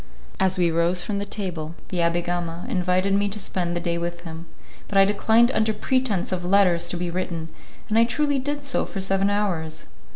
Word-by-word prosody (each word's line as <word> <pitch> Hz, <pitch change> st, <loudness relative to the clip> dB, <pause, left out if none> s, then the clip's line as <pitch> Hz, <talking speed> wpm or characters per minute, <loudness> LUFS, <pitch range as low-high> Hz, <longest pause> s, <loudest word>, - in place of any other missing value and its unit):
As 190 Hz, -1 st, +2 dB
we 175 Hz, -2 st, +3 dB
rose 170 Hz, +2 st, +2 dB
from 200 Hz, -2 st, -2 dB
the 200 Hz, -, -4 dB
table, 170 Hz, -6 st, -4 dB
the 185 Hz, -, -3 dB
Abbé 170 Hz, 0 st, +1 dB
Gama 175 Hz, -1 st, -3 dB
invited 185 Hz, +1 st, +1 dB
me 200 Hz, +1 st, +2 dB
to 205 Hz, -, -5 dB
spend 175 Hz, -4 st, -2 dB
the -, -, -1 dB
day 170 Hz, -1 st, -1 dB
with 170 Hz, 0 st, -4 dB
him, 165 Hz, 0 st, -8 dB, 0.4 s
but 200 Hz, -, -1 dB
I 195 Hz, -, +7 dB
declined 220 Hz, +4 st, +3 dB
under 220 Hz, -3 st, +1 dB
pretence 230 Hz, -4 st, 0 dB
of 180 Hz, -1 st, -2 dB
letters 180 Hz, -2 st, +3 dB
to 175 Hz, -, -3 dB
be 175 Hz, 0 st, -3 dB
written, 170 Hz, -2 st, -3 dB, 0.4 s
and 220 Hz, +1 st, +2 dB
I 230 Hz, -, +6 dB
truly 285 Hz, +3 st, 0 dB
did 290 Hz, +2 st, -3 dB
so 280 Hz, -2 st, 0 dB
for 195 Hz, -, -6 dB
seven 195 Hz, +1 st, +1 dB
hours. 180 Hz, -6 st, -1 dB
185 Hz, 205 wpm, -24 LUFS, 170-205 Hz, 0.4 s, I